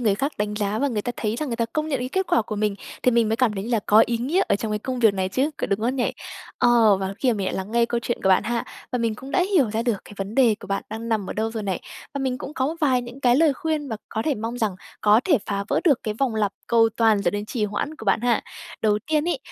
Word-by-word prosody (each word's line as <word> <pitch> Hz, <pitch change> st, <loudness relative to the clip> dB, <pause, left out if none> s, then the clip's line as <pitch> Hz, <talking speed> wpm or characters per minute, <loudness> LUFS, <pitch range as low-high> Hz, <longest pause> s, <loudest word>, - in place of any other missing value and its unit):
người 215 Hz, -5 st, +2 dB
khác 275 Hz, +8 st, -1 dB
đánh 210 Hz, 0 st, -1 dB
giá 210 Hz, 0 st, -1 dB
và 285 Hz, -, +1 dB
người 215 Hz, -5 st, -2 dB
ta 245 Hz, -, -3 dB
thấy 220 Hz, +1 st, -2 dB
rằng 300 Hz, 0 st, -3 dB
người 230 Hz, -, -2 dB
ta 230 Hz, -, +1 dB
công 310 Hz, 0 st, -1 dB
nhận 275 Hz, -4 st, 0 dB
cái 250 Hz, -, -3 dB
kết 380 Hz, +7 st, -1 dB
quả 230 Hz, -, +3 dB
của 210 Hz, 0 st, -5 dB
mình, 210 Hz, -1 st, 0 dB, 0.3 s
thì 250 Hz, -, +4 dB
mình 230 Hz, -2 st, +3 dB
mới 225 Hz, -, +1 dB
cảm 250 Hz, -4 st, +2 dB
thấy 195 Hz, -, -3 dB
như 235 Hz, -, -5 dB
là 230 Hz, -3 st, +2 dB
có 215 Hz, +2 st, +7 dB
ý 235 Hz, -1 st, -1 dB
nghĩa 310 Hz, +11 st, +1 dB
ở 200 Hz, -, +3 dB
trong 215 Hz, 0 st, -3 dB
cái 210 Hz, -, 0 dB
công 255 Hz, +3 st, -4 dB
việc 220 Hz, -4 st, +4 dB
này 190 Hz, -1 st, -1 dB
chứ, 265 Hz, +10 st, 0 dB
có -, -, -2 dB
đúng 200 Hz, +1 st, -1 dB
không 245 Hz, +4 st, 0 dB
nhỉ? 245 Hz, -, 0 dB, 0.5 s
Ờ, 230 Hz, -4 st, +5 dB
và 190 Hz, +1 st, -3 dB
khi 255 Hz, -3 st, +2 dB
mình 200 Hz, -4 st, -2 dB
lại -, -, -2 dB
lắng 190 Hz, +2 st, -4 dB
nghe 235 Hz, 0 st, +3 dB
câu 235 Hz, 0 st, -1 dB
chuyện 235 Hz, +1 st, -3 dB
của -, -, +2 dB
bạn 190 Hz, +1 st, +5 dB
ha 235 Hz, +2 st, -1 dB, 0.3 s
và 250 Hz, -, 0 dB
mình 230 Hz, -2 st, 0 dB
cũng 265 Hz, +5 st, -10 dB
đã 360 Hz, +3 st, +3 dB
hiểu 270 Hz, -, +4 dB
ra 220 Hz, +2 st, -1 dB
được 235 Hz, -3 st, +1 dB
cái -, -, -13 dB
vấn 195 Hz, +2 st, -5 dB
đề 240 Hz, -5 st, +5 dB
của -, -, -9 dB
bạn 195 Hz, 0 st, -1 dB
đang 225 Hz, +1 st, -5 dB
nằm 215 Hz, -4 st, -1 dB
ở -, -, -1 dB
đâu 220 Hz, +1 st, -1 dB
rồi 225 Hz, -1 st, -4 dB
này 190 Hz, -3 st, -2 dB, 0.3 s
và 280 Hz, -, -2 dB
mình 260 Hz, -2 st, -1 dB
cũng 285 Hz, -, -7 dB
có 260 Hz, -, 0 dB
một 315 Hz, -, -2 dB
vài 260 Hz, -4 st, +3 dB
những 245 Hz, +3 st, -10 dB
cái 245 Hz, -1 st, +4 dB
lời 315 Hz, -1 st, +4 dB
khuyên 310 Hz, 0 st, -2 dB
và 220 Hz, -, -3 dB
có 220 Hz, -, -2 dB
thể 300 Hz, -, +1 dB
mong 230 Hz, +1 st, -4 dB
rằng 215 Hz, -6 st, -1 dB, 0.2 s
có 210 Hz, +2 st, +5 dB
thể 310 Hz, -8 st, +4 dB
phá 200 Hz, -1 st, -2 dB
vỡ -, -, +1 dB
được 290 Hz, -8 st, +4 dB
cái 215 Hz, -, -2 dB
vòng 250 Hz, 0 st, 0 dB
lặp 210 Hz, -2 st, 0 dB
cầu 230 Hz, -1 st, +4 dB
toàn 220 Hz, -3 st, +3 dB
dẫn 175 Hz, -, +1 dB
đến 205 Hz, 0 st, -2 dB
trì 220 Hz, -1 st, -1 dB
hoãn 210 Hz, +9 st, -3 dB
của 220 Hz, -, -9 dB
bạn 195 Hz, +1 st, +2 dB
ha. 240 Hz, -1 st, +2 dB, 0.4 s
Đầu 210 Hz, -1 st, +3 dB
tiên 310 Hz, +1 st, +1 dB
ấy, 350 Hz, -, 0 dB
230 Hz, 320 wpm, -23 LUFS, 210-255 Hz, 0.5 s, có